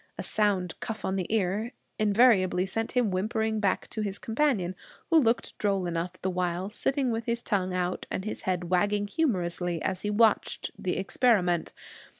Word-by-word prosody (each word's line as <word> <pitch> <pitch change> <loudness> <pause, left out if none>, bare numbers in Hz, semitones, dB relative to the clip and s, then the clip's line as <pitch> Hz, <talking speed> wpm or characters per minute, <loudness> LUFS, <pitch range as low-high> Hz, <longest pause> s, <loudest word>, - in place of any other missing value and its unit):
A - - -4
sound 195 -5 0
cuff 220 -2 -5
on 190 - -1
the 185 -1 -3
ear 215 +3 0 0.3
invariably 205 -4 +4
sent 225 +4 -3
him 245 -5 +2
whimpering 220 +3 0
back 200 -3 0
to 220 - -4
his 200 -2 -2
companion, 225 -7 0 0.4
who 325 - +7
looked 235 -4 +1
droll 195 -3 +1
enough 175 +1 -3
the 190 - +1
while, 180 +2 -2
sitting 265 +2 0
with 225 0 -2
his 235 0 -2
tongue 185 -3 0
out 180 0 -2
and 190 - -3
his 215 - -4
head 180 -1 -2
wagging 205 +3 +2
humorously 180 - -1
as 185 -1 -2
he 210 - -2
watched 220 +1 +2
the 180 - -2
experiment. 190 -4 +2
200 Hz, 170 wpm, -28 LUFS, 185-225 Hz, 0.4 s, who